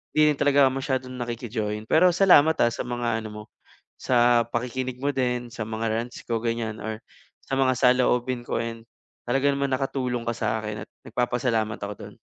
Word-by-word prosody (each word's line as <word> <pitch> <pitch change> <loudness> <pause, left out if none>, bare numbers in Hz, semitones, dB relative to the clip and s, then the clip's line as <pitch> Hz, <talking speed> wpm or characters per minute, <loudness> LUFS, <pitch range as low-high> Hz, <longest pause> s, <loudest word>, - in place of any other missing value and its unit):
hindi 150 0 +5
rin 145 - -3
talaga 145 0 +4
ako - - 0
masyadong 130 -1 -3
nakiki-join. 115 -3 -3
Pero 170 +3 +6
salamat, 160 -5 +6
ah, 120 - +3
sa - - -4
mga 120 -2 -1
ano 110 - -6
mo, 105 - -7 0.6
sa 120 -1 +3
pakikinig 125 +2 -3
mo 145 +1 +1
din, 125 -2 -1
sa 120 - -4
mga 110 +1 -2
rants 115 +2 -4
ko 115 -1 0
ganyan 115 -2 -2
or 110 0 -4 0.4
sa 135 - -3
mga 130 -1 +3
saloobin 125 0 +2
ko - - -3
and 115 0 -5 0.4
talaga 135 +3 +2
naman 140 0 -1
nakatulong 130 -2 -2
ka - - +2
sakin 105 -2 -3
at - - -46 0.2
nagpapasalamat 120 -3 -1
ako 100 +1 -4
dun. - - -10
120 Hz, 180 wpm, -25 LUFS, 115-130 Hz, 0.6 s, Pero